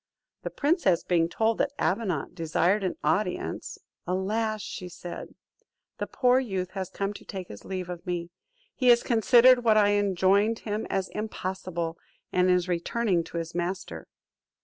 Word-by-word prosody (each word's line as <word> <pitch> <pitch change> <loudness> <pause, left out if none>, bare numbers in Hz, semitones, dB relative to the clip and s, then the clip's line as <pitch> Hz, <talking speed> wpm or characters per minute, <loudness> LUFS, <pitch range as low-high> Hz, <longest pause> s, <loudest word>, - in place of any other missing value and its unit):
The - - -4
princess 285 - +1
being 170 -2 +2
told 225 +4 0
that 280 - +1
Avenant 180 -2 -1
desired 175 +5 +1
an 185 - -1
audience: 215 - -1 0.3
"Alas," 215 +4 -1 0.3
said 175 0 -7
she, - - -24 0.6
"the - - -2
poor 250 0 +3
youth 190 -8 -3
has 190 -2 -4
come 200 +1 -3
to - - -11
take 190 -2 -7
his 105 - -10
leave 185 -2 -4
of 175 -1 -7
me! 175 -1 -3 0.4
He 255 - -1
has 240 -1 +6
considered 245 +2 +5
what 220 -2 +4
I 205 -1 +5
enjoined 200 +2 +2
him 215 0 -4
as 190 -1 -1
impossible, 185 -5 -4 0.3
and 180 0 +3
is 180 0 +3
returning 180 +1 0
to - - -7
his 165 0 -4
master." 175 +2 -4
190 Hz, 155 wpm, -27 LUFS, 175-220 Hz, 0.6 s, has